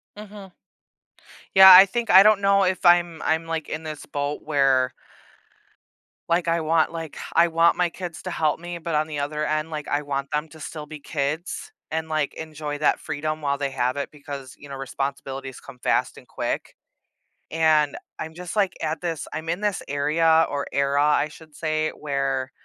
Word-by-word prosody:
Mhm. 205 -2 -11 1.0
Yeah 190 -1 +11
I 185 +2 +10
think 230 +4 -3
I 190 +1 +9
don't 210 -1 +5
know 200 0 +4
if 185 0 -1
I'm 175 -2 +4
I'm 160 +1 0
like 165 -1 -4
in 155 - -4
this 155 -2 -7
boat 145 +1 -3
where 135 -4 +2 1.4
like, 170 0 +1
I 165 0 +2
want, 160 0 +2
like, 165 -2 -7 0.2
I 170 - +6
want 165 0 +3
my 180 -1 +2
kids 175 -1 -7
to 185 - -4
help 155 -3 0
me, 175 0 -6
but 165 -1 -3
on 155 +1 +1
the 150 -2 -5
other 150 +1 -2
end 155 +1 -1
like 150 -2 -6
I 145 - 0
want 140 -1 -3
them 150 +1 -1
to 160 - -14
still 150 0 -7
be 155 0 -10
kids, 150 - -4 0.2
and 160 0 -3
like, 155 -2 -1
enjoy 155 -2 -6
that 150 - +2
freedom 155 +1 -4
while 140 -1 0
they 140 -1 -2
have 125 0 -1
it 140 - -3
because, 140 -3 -9
you 145 - -12
know, 140 - -7
responsibilities 135 0 -5
come 135 -2 -13
fast - - 0
and - - -15
quick, - - -4 0.7
and 155 -2 +2 0.2
I'm 160 - -6
just 180 +2 -7
like, 195 -4 +2
at 155 +1 -2
this 165 -3 -4
I'm 160 +1 -5
in 175 +4 -2
this 205 -2 -1
area 160 +3 +3
or 140 0 -3
era 140 +1 +1
I 150 0 +2
should 155 0 -16
say 155 -1 -1
where 135 -2 -2
155 Hz, 190 wpm, -24 LUFS, 145-170 Hz, 1.4 s, Yeah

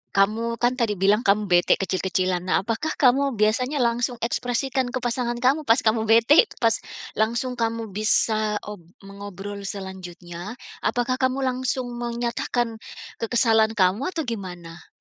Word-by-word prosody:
kamu 225 +4 +2
kan 245 +1 +2
tadi 215 -3 +1
bilang 205 +5 +3
kamu 210 +2 +4
bete 175 0 +5
kecil-kecilan. 185 -1 -1
Nah - - +3
apakah 235 +9 -2
kamu 275 0 +3
biasanya 250 +7 +1
langsung 240 +1 0
ekspresikan 250 +2 -1
ke 255 - -2
pasangan 240 0 -1
kamu 275 +5 +2
pas 225 - +6
kamu 220 0 +2
bete 230 - +6 0.2
pas 230 -1 +3 0.5
langsung 235 +3 0
kamu 230 -1 -2
bisa, 215 +1 +1
op 210 -1 -8 0.3
mengobrol 200 0 -8
selanjutnya, 185 0 -7 0.3
apakah 245 +1 0
kamu 260 +1 +1
langsung 255 0 -1
menyatakan 235 -1 -2 0.4
kekesalan 225 -1 +3
kamu 195 +6 +2
atau 325 -3 -3
gimana? 180 -6 -7
230 Hz, 135 wpm, -24 LUFS, 200-245 Hz, 0.5 s, pas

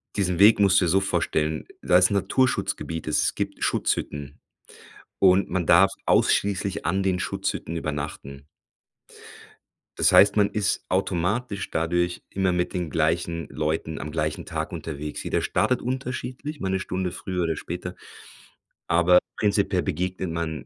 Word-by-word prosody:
diesen 90 -4 0
Weg 105 +3 +6
musst 100 -1 +5
du 90 - +1
dir - - +1
so 95 +3 +4
vorstellen, 80 -4 -1 0.2
da 90 - +4
ist 90 +2 +4
Naturschutzgebiet, 100 -6 0
es 75 - +1
gibt - - -4
Schutzhütten 70 -1 -2 0.8
und 95 0 +4
man 90 -2 -1
darf 90 +4 +6 0.2
ausschließlich 100 -1 +1
an 95 +3 +1
den 95 -2 0
Schutzhütten 85 -2 -3
übernachten. 70 -3 -5 1.5
Das - - +4
heißt, 100 +1 +6
man 100 -1 +4
ist 105 -2 -1
automatisch 100 +4 -1
dadurch 85 +2 -1
immer 95 -1 0
mit 90 0 -1
den 90 -4 -2
gleichen 85 +1 -1
Leuten 80 +1 -2
am 75 - -6
gleichen 75 -1 -2
Tag - - -4
unterwegs. 75 -1 -6
Jeder - - -1
startet 125 -1 +1
unterschiedlich, 130 +3 -5
mal 95 - -2
'ne 95 0 0
Stunde 95 -1 -3
früher 90 -1 -3
oder 80 -1 -1
später, 90 +1 -6 0.9
aber 90 +1 +5 0.2
prinzipiell 100 -3 +1
begegnet 90 +3 -3
man 80 -2 -4
90 Hz, 140 wpm, -25 LUFS, 80-100 Hz, 1.5 s, Weg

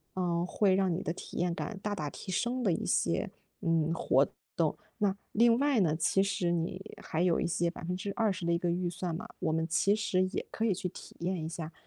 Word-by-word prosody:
呃， 175 -2 +1
会 190 +1 +3
让 190 -2 +2
你 170 - -2
的 165 - -2
体 - - -9
验 175 0 +1
感 205 +2 -4
大 205 0 -1
大 150 -6 -3
提 190 - -9
升 245 +7 0
的 200 - +3
一 - - -2
些， - - +1 0.3
嗯， 165 -3 +2
活 165 - +3 0.3
动。 - - +2 0.2
那， 205 -3 +3 0.2
另 230 +1 +5
外 280 -2 +3
呢， 160 -5 +3
其 170 +4 +3
实 195 -3 0
你 175 +4 -3
还 160 - -1
有 175 -2 +3
一 - - +1
些 170 0 +1
20% 185 +3 -2
的 170 - +2
一 - - +3
个 175 0 0
预 175 0 0
算 175 0 -3
嘛， 175 - -6
我 165 -3 0
们 160 +1 +1
其 195 +4 +3
实 215 -3 +1
也 185 - -3
可 220 - -3
以 215 - +3
去 185 +1 -3
体 180 - -10
验 175 -1 -1
一 - - -2
下， 165 -1 -6
180 Hz, 240 characters per minute, -31 LUFS, 170-200 Hz, 0.3 s, 另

